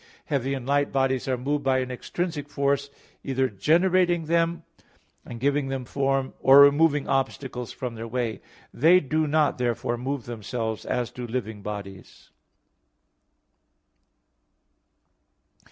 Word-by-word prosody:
Heavy 135 -2 -1
and 130 -2 -6
light 145 +1 +1
bodies 135 -1 0
are 130 -1 0
moved 145 +3 -2
by 135 -1 +2
an 130 0 -2
extrinsic 150 +3 -4
force, 140 0 0 0.3
either 135 -1 0
generating 175 - +2
them 170 +1 +1 0.6
and 120 - -9
giving 140 +2 +1
them 135 -1 -4
form, 135 0 -1
or 135 +1 +8
removing 145 +1 +4
obstacles 135 -2 -2
from 125 -2 -5
their 115 0 -7
way. 115 -1 -3 0.3
They 165 +7 +5
do 155 +1 -1
not 150 -2 +1
therefore 120 -1 -1
move 135 0 -3
themselves, 110 -1 -4
as 125 -2 -1
do 125 -1 -7
living 110 -3 -4
bodies. 100 -2 -9
135 Hz, 125 wpm, -25 LUFS, 120-145 Hz, 0.6 s, or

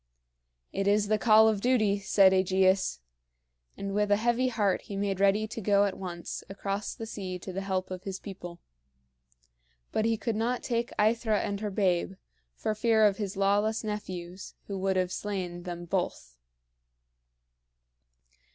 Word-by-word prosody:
"It 195 0 -1
is 205 0 +3
the 215 0 +2
call 220 +1 +6
of 215 -3 +1
duty," 215 -5 +2
said 195 -1 +5
AEgeus; 190 - +2 0.8
and 200 0 -4
with 210 0 +1
a 205 - +5
heavy 240 +4 +1
heart 205 -6 +1
he 200 - -8
made 195 -1 -1
ready 200 +2 +3
to 225 - -6
go 200 0 +4
at 195 - -2
once 175 -2 -6
across 200 +1 -4
the 225 - -6
sea 190 -5 -5
to 185 +1 -8
the 195 - -3
help 190 -1 -2
of 185 -1 -5
his 190 -1 -5
people. 175 -3 -9 1.3
But 220 - 0
he 225 0 +2
could 225 +1 -2
not 235 +3 -1
take 235 0 -1
AEthra 220 0 +2
and 200 -1 -3
her 210 0 -2
babe, 190 -2 +1 0.4
for 215 - -1
fear 220 0 +3
of 200 -2 +3
his 200 -3 -4
lawless 205 +3 +2
nephews, 185 -4 -6
who 195 -1 -5
would 190 0 0
have 185 -1 0
slain 185 -4 -4
them 175 -1 -6
both. 165 - -3
200 Hz, 160 wpm, -29 LUFS, 190-215 Hz, 1.3 s, call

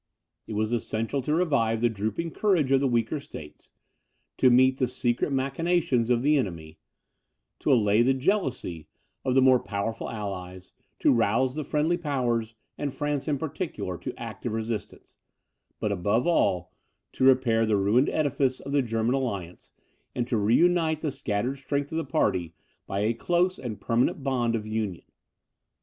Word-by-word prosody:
It - - -5
was 110 +1 -1
essential 115 +3 -1
to 150 +4 0
revive 140 -10 +1
the 120 - +3
drooping 110 +10 -3
courage 175 -10 +1
of 135 - +5
the 135 - +1
weaker 120 +4 0
states, 75 - -11 0.7
to 130 - +5
meet 130 +1 +4
the 130 - +2
secret 120 +2 -1
machinations 135 -2 +1
of 120 0 +2
the 150 +1 +4
enemy, 80 - -4 0.8
to - - +1
allay 110 -3 +4
the 130 +2 +3
jealousy 130 - -1 0.4
of 130 - 0
the 135 - +5
more 130 -1 +6
powerful 110 +2 -4
allies, 95 -4 -6 0.3
to - - +5
rouse 115 +3 +2
the 155 +1 -3
friendly 155 +4 +1
powers, 120 -7 -1 0.2
and 145 -2 -3
France 145 -1 -2
in 145 -2 +1
particular, 145 - -4
to - - -7
active 110 - -5
assistance; 110 -1 -5 0.6
but 105 - -1
above 100 +5 +1
all, 95 - +1 0.4
to - - -3
repair 125 -4 +4
the 105 -2 +2
ruined 105 +8 +3
edifice 135 -3 0
of 140 - -7
the 140 0 +3
German 115 0 0
alliance, 100 -10 -4 0.4
and 120 -1 -1
to 125 - -1
reunite 160 +9 +3
the 150 - -1
scattered 125 +2 -2
strength 140 +1 -2
of 160 - -1
the - - -2
party 90 - 0 0.3
by 100 +1 -2
a 110 +3 +1
close 175 +9 0
and 110 -5 -6
permanent 120 +5 0
bond 120 -4 0
of 110 -2 -3
union. 110 -5 -3
125 Hz, 165 wpm, -26 LUFS, 110-140 Hz, 0.8 s, more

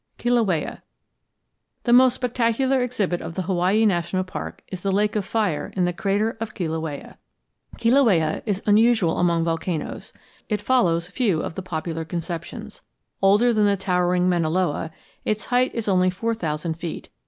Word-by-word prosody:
KILAUEA 225 -10 0 1.0
The 240 - +2
most 255 0 +6
spectacular 250 +2 +1
exhibit 205 -8 -1
of 165 - -7
the 185 - -2
Hawaii 190 +4 +2
National 185 -1 +1
Park 185 - -7
is 185 -2 -6
the 195 - -1
lake 205 +2 +1
of 210 - 0
fire 205 -8 -1
in 185 -2 +2
the 175 - -1
crater 205 +5 0
of 215 -1 -5
Kilauea. 160 -4 -4 0.6
Kilauea 230 - +3
is 200 -1 -1
unusual 215 -4 +3
among 170 -2 +2
volcanoes. 165 0 -3 0.4
It 210 -2 0
follows 180 -8 +2
few 200 -7 0
of - - -4
the 190 - -5
popular 165 -2 -4
conceptions. 170 +1 -6 0.4
Older 205 +5 +4
than 210 -2 +3
the 200 -1 +2
towering 180 -1 +1
Mauna 170 -3 +1
Loa, 165 -2 0 0.3
its 215 -1 -1
height 250 +1 +4
is 230 -2 -3
only 185 -2 +3
four 225 +6 -2
thousand 160 -4 -3
feet. 170 -2 -6
190 Hz, 155 wpm, -23 LUFS, 170-225 Hz, 1.0 s, most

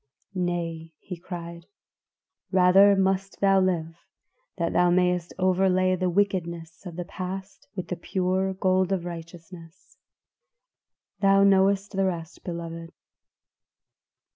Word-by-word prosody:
"'Nay,' 170 -3 -3
he 180 - -8
cried, 170 -1 -8 0.8
'rather 190 +2 +6
must 195 0 0
thou 195 -1 +4
live, 165 -3 -1 0.6
that 170 -2 -1
thou 175 0 +4
mayest 180 -1 +1
overlay 185 0 +2
the 185 0 -1
wickedness 175 -3 -2
of 170 - -8
the 175 0 -5
past 190 +7 -7
with 185 - -5
the 180 - -2
pure 185 +1 -1
gold 185 0 +1
of 185 -3 -1
righteousness.' 170 0 -11 1.2
"Thou 195 0 +4
knowest 195 0 +3
the 195 -1 0
rest, 170 -3 -4
beloved." 165 -1 -6
180 Hz, 115 wpm, -26 LUFS, 170-190 Hz, 1.2 s, rather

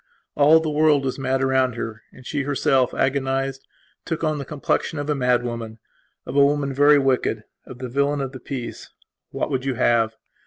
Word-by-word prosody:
All 150 +3 +6
the 160 - -3
world 150 -2 +3
was 130 +1 -3
mad 135 0 0
around 130 -2 +2
her 115 -1 -5
and 130 - -16
she 145 - -2
herself, 135 -2 +1
agonized, 135 0 -1 0.4
took 165 -1 -4
on 155 -2 0
the 140 - -5
complexion 150 +3 -2
of 145 +1 -2
a - - +3
mad 125 -3 +1
woman; 115 -2 -5 0.5
of - - -6
a 140 - +6
woman 140 -1 +1
very 145 +2 +5
wicked; 135 -2 0 0.2
of 125 - -10
the 130 0 -5
villain 140 +3 0
of 135 -2 -3
the 130 - -9
piece. 125 -1 -7 0.4
What - - -3
would 130 -1 -1
you 135 -2 -1
have? 115 -2 +2
135 Hz, 195 wpm, -22 LUFS, 125-145 Hz, 0.5 s, All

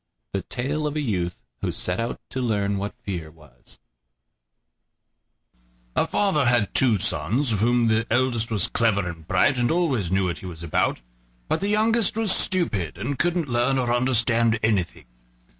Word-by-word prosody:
THE - - -1
TALE 150 +5 -3
OF 150 - -4
A - - 0
YOUTH 90 - -2 0.2
WHO - - -1
SET 90 0 -2
OUT 115 +1 -3
TO 130 - -3
LEARN 100 -4 0
WHAT 100 +1 -5
FEAR 85 -6 -5
WAS 75 -3 -17 2.2
A - - +2
father 170 -10 +1
had 120 -4 +2
two 120 -5 +4
sons, 110 - 0
of 105 - -1
whom 120 +2 +2
the 115 0 +1
eldest 120 -1 +1
was 105 -5 0
clever 105 -5 +1
and 85 -2 -8
bright, 125 +8 +2
and 120 - +1
always 140 - 0
knew 95 0 +2
what 85 -4 -3
he 95 - -8
was 85 -2 -8
about; 75 -6 0 0.5
but - - 0
the 200 - -1
youngest 220 +1 +2
was 225 -3 +3
stupid, 115 - +1
and 135 +2 -4
couldn't 175 -2 0
learn 125 +2 +1
or 120 -2 +1
understand 115 -2 +2
anything. 105 -6 0
115 Hz, 170 wpm, -24 LUFS, 95-135 Hz, 2.2 s, two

